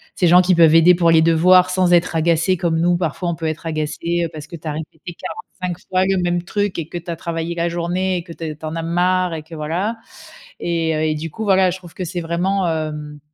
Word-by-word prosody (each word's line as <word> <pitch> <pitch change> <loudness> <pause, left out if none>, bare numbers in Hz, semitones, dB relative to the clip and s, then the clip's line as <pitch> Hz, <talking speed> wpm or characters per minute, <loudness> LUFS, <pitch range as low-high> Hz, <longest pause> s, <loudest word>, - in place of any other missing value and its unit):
ces 180 - +2
gens 180 +2 +7
qui 185 0 +3
peuvent 165 -1 +6
aider 165 +2 +7
pour 170 -1 +3
les 160 -1 +5
devoirs 180 +3 +5
sans 180 -1 +2
être 170 -1 +2
agacés, 165 +3 +2
comme 165 -2 0
nous, 175 +1 +2
parfois, 175 +1 -2
on 170 - -2
peut 160 -1 -4
être 155 +1 -5
agacés, 165 +2 -2
heu, 165 - -5
parce 155 -2 -8
que 170 - -9
tu 160 0 -9
as - - -1
répété 160 +3 -8
45 180 +1 -6
fois 185 0 +2
le 195 0 +1
même 175 0 0
truc 205 +1 -2
et 160 -2 -4
que 175 - -5
tu 170 - -12
as 170 - -2
travaillé 165 +1 -4
la 170 0 0
journée 180 +2 -1
et 170 - -5
que 170 -2 -10
t 160 -2 -6
tu 160 - -9
en 155 +1 -4
as 165 - -2
marre 180 +1 +1
et 160 - -4
que 165 +1 -11
voilà. 175 +9 -2 0.6
Et 165 -2 -1
heu, 155 - -1
et 155 - +1
du 155 +1 -5
coup, 220 - -7
voilà, 190 -2 +4
je 185 - -5
trouve 175 -3 -14
que 185 - -4
c'est 175 +1 -4
vraiment 175 +3 0
hem, 150 -2 -4
170 Hz, 260 wpm, -19 LUFS, 160-180 Hz, 0.6 s, gens